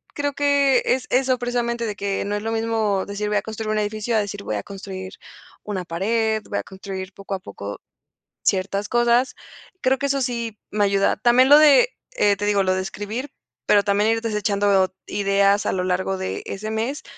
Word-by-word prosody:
Creo 285 -1 -1
que, 280 -2 +3
es 255 0 +1
eso 255 0 +2
precisamente 240 -1 -1
de 210 -2 -3
que, 200 -1 -2
no 205 +1 -2
es 205 - -3
lo 225 +1 -3
mismo 225 -3 0
decir: 200 +1 -4
"Voy 210 0 +1
a - - +1
construir 220 0 -5
un 215 - 0
edificio.", 215 +2 -2
a - - +4
decir: 205 -1 -4
"Voy 110 - -3
a 100 - -3
construir 190 -1 -8 0.5
una 190 -4 -4
pared, 220 +5 0
voy - - -2
a - - -4
construir 190 -1 -7
poco 195 0 -5
a - - -5
poco, 100 - -8 0.6
ciertas 195 +2 0
cosas". 240 +2 +2 0.5
Creo 260 +1 +2
que 280 - 0
eso 275 0 0
sí, 235 -3 -3
me 210 0 +1
ayuda. 195 0 +2
También 245 +4 +4
lo 295 +1 +9
de, 305 - +6 0.3
eh, 205 - +3
te 205 - -2
digo 205 -1 +2
lo 185 0 +2
de 185 - -1
escribir. 210 +8 -5 0.4
Pero 205 -1 +5
también 205 +2 +2
ir 225 0 +1
desechando 200 -3 +1
ideas 200 0 +2
a - - +1
lo 185 -1 -1
largo 190 +1 -1
de 190 0 -4
ese 215 +2 -5
mes, 235 +7 -2
210 Hz, 205 wpm, -22 LUFS, 195-235 Hz, 0.6 s, lo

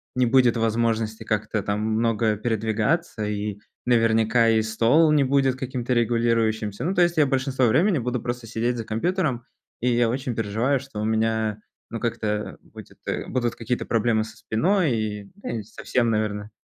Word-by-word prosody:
не 125 0 +3
будет 125 -1 +4
возможности 115 -1 0
как-то 110 -1 -1
там 100 +1 -1
много 110 0 +1
передвигаться, 110 +4 -1
и 105 -1 -3 0.3
наверняка 115 -1 +3
и 110 -1 +3
стол 115 +9 +3
не 150 -2 +4
будет 135 -1 +2
каким-то 130 -1 -3
регулирующимся. 115 -3 +1
Ну, 180 +5 0
то 180 - +2
есть 175 -1 +2
я 150 - +5
большинство 130 -1 +1
времени 160 - +3
буду 125 -1 -2
просто 120 -1 -4
сидеть 115 +2 -1
за 115 - -3
компьютером, 135 - -1 0.4
и 125 - +1
я 120 0 +3
очень 125 -1 -3
переживаю, 115 +6 0
что 135 -6 -8
у 105 - -1
меня, 110 -1 0 0.3
ну, 115 - -5
как-то 105 -3 -2
будет - - -14
э - - -2
будут 120 -3 -1
какие-то 120 +1 -3
проблемы 115 -1 +1
со 110 +1 -13
спиной 160 - +1
и, 105 -2 -4
да 205 - -8
и - - -7
совсем, 115 +3 -1
наверно. 105 -1 -2
115 Hz, 170 wpm, -24 LUFS, 110-125 Hz, 0.4 s, я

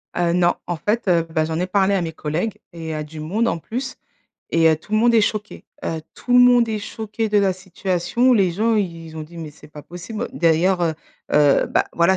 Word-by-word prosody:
Heu, 175 -1 +1
non. 175 0 +3
En 175 - -1
fait, 210 +6 -1
heu, 170 -3 +3
bah, 155 -1 0
j'en 160 +1 -3
ai 180 - -1
parlé 195 +1 +2
à 195 - +1
mes 165 -1 -4
collègues 160 +8 -3 0.2
et 160 -1 -6
à 155 - -3
du 155 +1 -10
monde 200 +10 -1
en 170 - 0
plus 255 - -5 0.6
et 165 -1 +5
heu, 160 - +3
tout 180 +7 -15
le 215 - +4
monde 235 +1 +4
est 225 - +6
choqué. 210 0 -3 0.2
Heu, 160 - -2
tout 245 - -4
le 245 - +7
monde 245 -2 +5
est 215 - -1
choqué 220 +1 -4
de 210 0 +3
la 195 -2 +3
situation, 190 +5 0
les 195 -6 +3
gens 220 +6 +1
ils 165 -5 -3
ont 155 - -5
dit: 170 +3 -12
«Mais 160 -2 -6
c'est 150 0 -17
pas 150 -1 -11
possible». 180 - -6
D'ailleurs, 175 +2 +2
heu 165 -2 +1 0.4
heu, 145 -2 +4
bah, - - +1
voilà, 170 +3 +3
180 Hz, 235 wpm, -21 LUFS, 160-215 Hz, 0.6 s, le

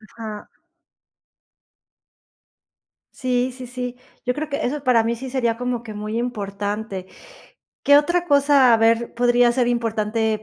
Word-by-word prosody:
Ajá. 215 -2 -7 2.7
Sí, 250 0 0
sí, 255 -1 -8
sí. 250 0 -5 0.3
Yo 250 - +1
creo 310 +3 -4
que 280 - -2
eso 280 +3 -3
para 245 -4 +4
mí 230 +1 -1
sí 260 +3 -7
sería 240 -3 0
como 245 0 -3
que 220 -2 -8
muy 215 +2 -4
importante. 205 -4 -4 0.8
¿Qué 285 - +7
otra 345 +4 +2
cosa, 280 -4 +5
a - - +5
ver, 230 +1 +2
podría 245 0 +3
ser 245 -1 +1
importante 220 -2 -1
240 Hz, 140 wpm, -22 LUFS, 225-255 Hz, 2.7 s, Qué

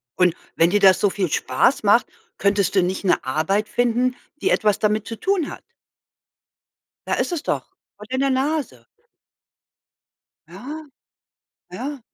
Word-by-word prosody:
Und 180 -2 +3 0.2
wenn 165 - +4
dir 205 +3 +2
das 190 -2 +6
so 205 - +3
viel 190 -2 -2
Spaß 175 - +1
macht, 215 +4 +4 0.3
könntest 200 -1 +1
du 190 - +4
nicht 185 +3 -2
'ne 190 - +2
Arbeit 160 +10 0
finden, 245 +1 +1 0.3
die - - +1
etwas 210 -2 +2
damit 215 0 0
zu 225 - -7
tun 385 -6 0
hat? - - -10 1.4
Da - - 0
ist - - -1
es 340 -3 -3
doch, - - -3 0.2
vor 210 - -11
deiner 270 +1 0
Nase. 280 +3 -1 1.6
Ja. 305 +4 -8 0.9
Ja. 280 +2 -5
215 Hz, 145 wpm, -22 LUFS, 195-265 Hz, 1.6 s, das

